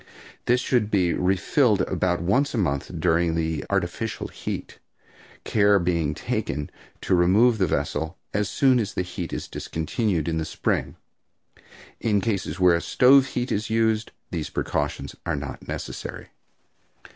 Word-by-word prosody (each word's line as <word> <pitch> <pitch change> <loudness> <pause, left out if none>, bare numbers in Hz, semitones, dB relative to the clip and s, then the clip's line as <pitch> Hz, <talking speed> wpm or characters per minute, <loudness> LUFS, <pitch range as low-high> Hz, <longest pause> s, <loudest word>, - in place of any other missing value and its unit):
This 125 +1 +3
should 120 -4 +1
be 90 -5 +2
refilled 95 - +2
about 90 -2 0
once 130 +10 +1
a - - -1
month 70 -9 -1
during 80 -1 +1
artificial 100 +3 -2
heat, - - -6 0.6
care 100 -1 +4
being 85 -4 0
taken 75 0 -3 0.3
to - - 0
remove 105 +7 +4
the 95 - +3
vessel 80 +3 -2 0.2
as 105 -1 0
soon 130 -3 +3
as 105 -3 -3
the 90 - 0
heat 90 -1 -6
is - - -4
discontinued 85 +1 -2
in 80 -1 0
the - - -1
spring. - - -1 1.0
In 105 -3 +2
cases 95 -5 -2
where 90 -2 +5
stove 135 +1 +5
heat 125 -1 -3
is 105 +2 -1
used 110 -1 +1 0.2
these - - -3
precautions - - -2
are 85 -3 -1
not 70 -1 -7
necessary. - - -6
95 Hz, 140 wpm, -24 LUFS, 85-110 Hz, 1.0 s, where